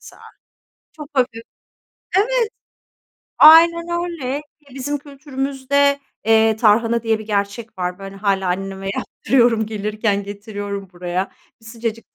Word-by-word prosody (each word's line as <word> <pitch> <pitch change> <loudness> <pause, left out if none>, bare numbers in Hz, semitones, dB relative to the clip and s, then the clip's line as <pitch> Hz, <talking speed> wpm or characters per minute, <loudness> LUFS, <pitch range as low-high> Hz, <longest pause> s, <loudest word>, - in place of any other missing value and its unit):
mesela. - - -15 0.7
Çok 300 -2 -10
hafif. 245 -4 0 0.7
Evet, 460 +2 +2 0.9
aynen 335 +2 +8 0.2
öyle. 290 -6 -4
Ki 295 -2 -21
bizim 285 +2 -3
kültürümüzde, 280 0 -1 0.3
eee, 220 0 +4
"tarhana" 230 +1 +3
diye 225 -1 +1
bir 215 - -9
gerçek 205 +1 -3
var. 180 0 -3
Böyle 195 0 -9
hâlâ 195 -2 0
anneme 195 +1 -3
yaptırıyorum. 235 -4 +1
Gelirken 210 -1 -1
getiriyorum 200 -1 -6
buraya. 180 +1 -3 0.3
Bir 225 - -18
sıcacık 230 0 -6
225 Hz, 120 wpm, -20 LUFS, 200-280 Hz, 0.9 s, aynen